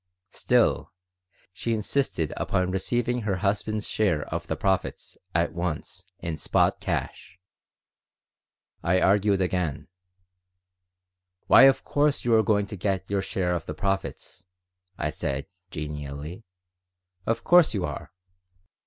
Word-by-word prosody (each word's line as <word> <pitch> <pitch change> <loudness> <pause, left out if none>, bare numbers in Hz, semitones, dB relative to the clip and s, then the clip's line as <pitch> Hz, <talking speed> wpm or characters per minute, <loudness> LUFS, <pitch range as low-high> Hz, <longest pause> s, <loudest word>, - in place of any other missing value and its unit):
Still, 125 -2 +2 0.6
she 115 +5 -1
insisted 105 - -1
upon 90 0 0
receiving 120 +5 0
her 105 -3 -1
husband's 105 +1 0
share 85 -9 +1
of 85 0 -3
the 80 - -1
profits 95 +3 -1 0.2
at 85 +1 +1
once 85 +1 -4
in 85 -3 -4
spot - - +2
cash. 90 - -4 1.4
I 90 +2 +2
argued 100 0 +3
again 90 -6 -1 1.6
"Why, 135 - +8
of 135 0 +4
course 145 -2 +1
you 120 - +3
are 110 - +6
going 105 -1 +2
to 100 - -7
get 95 0 -2
your 100 -1 +1
share 95 -2 -1
of 85 -2 -3
the - - -5
profits," 95 -2 -3 0.5
I 75 -2 -1
said, 70 -1 -3 0.2
genially. 75 +4 -6 0.8
"Of 115 +1 0
course 175 -8 +5
you 95 -3 0
are. 75 - -6
95 Hz, 125 wpm, -26 LUFS, 85-110 Hz, 1.6 s, Why